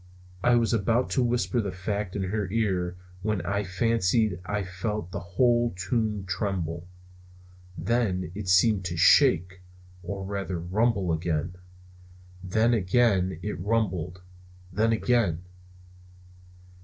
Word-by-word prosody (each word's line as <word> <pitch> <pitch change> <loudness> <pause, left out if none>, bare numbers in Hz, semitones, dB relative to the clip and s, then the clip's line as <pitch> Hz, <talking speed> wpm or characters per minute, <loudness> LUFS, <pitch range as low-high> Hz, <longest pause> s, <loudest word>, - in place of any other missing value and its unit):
I 120 0 +5
was 115 0 +2
about 115 +3 +1
to 130 - +2
whisper 120 -3 +1
the 100 -3 -3
fact 100 +1 -4
in 100 - -1
her 105 -3 -2
ear 95 -5 -1 0.2
when 105 0 -1
I 100 +2 -1
fancied 105 0 +1
I 100 +1 -1
felt 95 0 -4
the - - -4
whole 120 +5 +1
tomb 105 0 -1
tremble! 90 -4 -3 0.9
Then 95 -4 0
it 100 -1 -5
seemed 95 +2 +4
to 85 -1 -3
shake, 90 - +4 0.4
or 100 +1 -5
rather 95 -2 -3
rumble 95 0 +1
again. 80 +1 -2 0.9
Then 110 +6 +2
again 95 -3 +2
it 105 - -4
rumbled. 90 -4 -1 0.5
Then 110 +4 +2
again! 110 -7 +1
100 Hz, 120 wpm, -27 LUFS, 90-115 Hz, 0.9 s, I